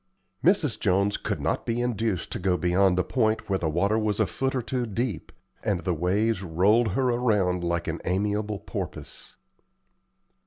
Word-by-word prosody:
Mrs. 165 - +3
Jones 100 +1 +2
could - - -3
not - - -1
be 115 +1 -1
induced 115 -6 -1
to - - -3
go 90 -1 +1
beyond 90 +1 +3
a 90 - +3
point 110 +2 0
where 95 -1 0
the 80 - 0
water 100 +7 +1
was 110 -1 -1
a 110 - +4
foot 135 +6 -2
or 130 - +1
two 125 0 -2
deep, 110 -3 -3 0.3
and 95 -4 0
the 90 -2 0
waves 95 +5 +1
rolled 100 +5 +2
her 130 +3 +1
around 105 -7 +1
like 85 -1 -1
an - - -3
amiable 105 +3 -1
porpoise. - - -6
105 Hz, 170 wpm, -26 LUFS, 90-115 Hz, 0.3 s, a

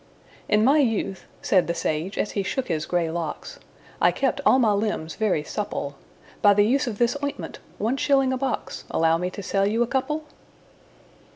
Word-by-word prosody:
"In 210 +1 +4
my 285 +4 +5
youth," 225 -7 0 0.2
said 185 -3 +3
the 170 - -1
sage, 160 +6 -2
as - - -1
he 200 - -1
shook 250 +7 -3
his 155 -1 -1
grey 170 -2 0
locks, 170 - -5 0.4
"I - - +6
kept 275 +1 -1
all - - +6
my 230 -5 +3
limbs 200 -6 -1
very 190 -5 0
supple 150 -6 -4 0.5
By 205 -1 +6
the 205 0 +5
use 260 +4 +2
of 220 -4 -3
this 240 +2 +2
ointment 285 - -4 0.2
one 230 +6 0
shilling 270 -1 +2
a - - -1
box 270 0 -3
Allow 165 0 +2
me 180 +1 -1
to 195 +2 -8
sell 195 +1 +1
you 225 +3 +2
a - - -3
couple?" 300 +5 -1
210 Hz, 190 wpm, -24 LUFS, 180-260 Hz, 0.5 s, I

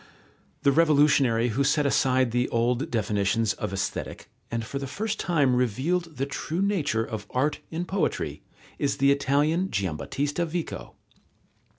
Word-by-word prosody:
The 140 - +5
revolutionary 140 -6 +4
who 125 +5 0
set 145 +1 +2
aside 130 -3 +2
the 125 +1 0
old 120 +2 0
definitions 105 -1 +1
of 105 - -4
Aesthetic, 95 0 -4 0.2
and 115 -1 -3
for 140 +5 -4
the 135 - -4
first 215 +9 -3
time 145 -8 +2
revealed 145 - -1
the 135 - 0
true 160 +6 -3
nature 150 - 0
of 110 -3 -6
art 145 +4 0
and 170 +2 -3
poetry, 195 -1 -2 0.4
is 140 -1 0
the 140 +1 +4
Italian, 145 +6 +1
Giambattista 140 - -2
Vico. 170 0 -5
140 Hz, 145 wpm, -26 LUFS, 115-155 Hz, 0.4 s, The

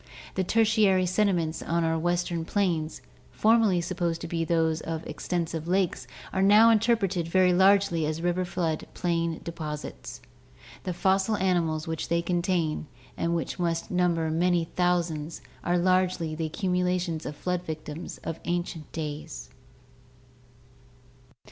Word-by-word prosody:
The 190 - 0
Tertiary 210 -3 +3
sediments 180 -4 +1
on 170 +1 0
our 165 0 +1
western 175 0 0
plains, 170 -4 -1 0.3
formerly 220 -5 +3
supposed 170 -1 -2
to 170 - -5
be 165 0 -1
those 160 -1 +1
of 160 -1 -4
extensive 165 -2 -3
lakes, 180 -8 0 0.3
are 190 - +1
now 210 +4 +7
interpreted 210 -6 +2
very 185 +1 +4
largely 190 -3 +4
as 155 +1 -2
river 175 +2 0
flood 175 -3 -2
plain 170 -2 -1
deposits. 155 -3 -6 0.7
The 180 - -1
fossil 195 +4 +2
animals 170 -5 0
which 160 -1 -3
they 170 0 +1
contain, 175 -3 0 0.3
and 170 0 0
which 170 - -3
must 165 -1 -1
number 170 -3 +1
many 170 0 +1
thou 180 -1 +3
sands, 160 -1 -6 0.2
are 175 0 +1
largely 185 -2 +1
the 160 0 -2
accumulations 180 -1 -1
of 150 - -5
flood 180 +3 -2
victims 155 0 -6
of 165 - -4
ancient 175 -2 -3
days. 145 - -6
175 Hz, 135 wpm, -27 LUFS, 160-185 Hz, 0.7 s, now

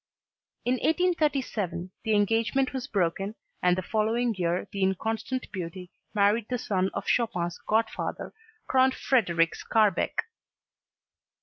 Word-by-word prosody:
In 250 +1 +2
1837, 275 - 0
the 220 -1 +2
engagement 225 +6 +2
was 260 -2 -3
broken 195 +2 -1 0.3
and 180 0 +3
the 185 - -2
following 225 +4 +1
year 175 -2 -1
the 200 - -4
inconstant 220 +6 -1
beauty 180 0 -6 0.2
married 205 +2 +3
the 250 - 0
son 190 -4 0
of - - -3
Chopin's 175 -8 0
godfather, 220 +1 -1 0.3
Count 260 0 +4
Frederic 170 -10 +2
Skarbek. 220 - +1
215 Hz, 115 wpm, -27 LUFS, 185-245 Hz, 0.3 s, Count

